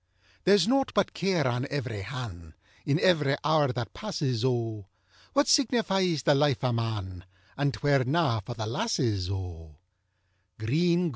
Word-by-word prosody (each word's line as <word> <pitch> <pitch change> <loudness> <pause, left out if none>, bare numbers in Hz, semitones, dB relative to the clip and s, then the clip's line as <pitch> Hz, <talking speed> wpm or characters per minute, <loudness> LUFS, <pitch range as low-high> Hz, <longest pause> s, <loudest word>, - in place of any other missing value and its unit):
THERE'S 195 -1 +5
nought 270 +2 +1
but 200 -3 +1
care 175 -6 +1
on 125 +2 -1
ev'ry 125 -7 -3
han', 95 - -8 0.3
In 140 +1 +3
ev'ry 150 -7 +3
hour 155 -2 +3
that 120 -2 -5
passes, 140 - -2
O: 115 -6 -1 0.5
What 285 +1 +3
signifies 195 - +2
the 150 - +4
life 140 -2 +2
o' 125 - +2
man, 105 -6 -3 0.3
And 140 0 0
'twere 140 -2 +1
na 140 -4 +1
for 120 +4 -7
the 110 -2 -4
lasses, 115 - -1
O. 85 -5 -6
130 Hz, 140 wpm, -28 LUFS, 110-170 Hz, 0.5 s, THERE'S